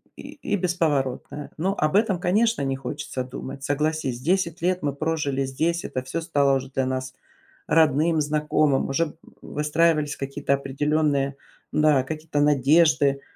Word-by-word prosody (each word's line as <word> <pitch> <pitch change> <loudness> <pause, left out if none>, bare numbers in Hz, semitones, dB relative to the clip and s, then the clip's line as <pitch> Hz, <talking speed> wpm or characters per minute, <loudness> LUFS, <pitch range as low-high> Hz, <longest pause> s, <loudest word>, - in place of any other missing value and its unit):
и 280 -7 -5
бесповоротное. 150 -6 -1
Но 190 +5 0
об 155 +2 +1
этом, 205 -4 +2
конечно, 210 +3 +2
не 135 -1 -1
хочется 135 -1 -5
думать, 130 +1 -8
согласись, 145 -3 -1
10 170 +3 0
лет 180 +1 +1
мы 145 -2 -1
прожили 145 -3 -1
здесь, 160 +6 -1
это 130 - -3
всё 130 +6 -4
стало 140 -4 +2
уже 135 0 -7
для 135 -1 0
нас 130 0 -3 0.5
родным, 160 +1 +3
знакомым, 150 -2 +1
уже 150 +3 -1 0.3
выстраивались 150 0 +1
какие-то 140 +1 -2
определенные, 140 0 0 0.4
да, 150 -3 +3
какие-то 155 +1 -4
надежды. 145 0 +3
150 Hz, 135 wpm, -24 LUFS, 135-165 Hz, 0.5 s, родным